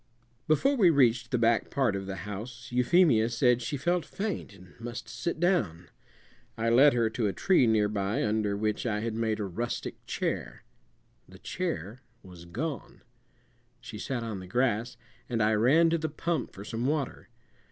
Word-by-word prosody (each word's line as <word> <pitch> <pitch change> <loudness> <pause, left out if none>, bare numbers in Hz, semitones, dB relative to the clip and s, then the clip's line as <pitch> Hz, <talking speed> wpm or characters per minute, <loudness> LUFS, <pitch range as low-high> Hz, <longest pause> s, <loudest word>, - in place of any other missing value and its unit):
Before 215 - +3
we 200 -9 +5
reached 120 -5 +3
the 125 - +1
back 115 0 +2
part 130 -7 +1
of 95 -1 -5
the 95 - -4
house 120 +4 -7
Euphemia 125 -2 +4
said 125 +1 +2
she 145 +5 -3
felt 175 +5 0
faint 200 - -4
and 90 -2 -16
must 120 +1 -6
sit 170 -2 -4
down. 100 - 0 0.7
I 115 +1 0
led 140 +5 +6
her 120 -2 +2
to 110 -1 0
a 100 - -1
tree 185 -10 +3
nearby, 105 -2 +1
under 105 -1 0
which 105 +3 -1
I 105 -2 -1
had 115 0 -2
made 110 -1 -1
a - - -1
rustic 115 +6 -4
chair. - - -3 0.7
The 95 - -13
chair 120 - -4 0.2
was 90 -3 -12
gone. 135 - -5 0.8
She 115 -3 -9
sat 120 +1 -3
on 110 -4 -4
the 95 - -9
grass, 120 +2 0 0.3
and 120 -2 -1
I 110 +1 +3
ran 145 +10 +4
to 165 - +1
the 160 0 -2
pump 165 +2 -2
for 100 - -10
some 115 +4 -2
water. 145 -5 -2
115 Hz, 175 wpm, -29 LUFS, 105-140 Hz, 0.8 s, led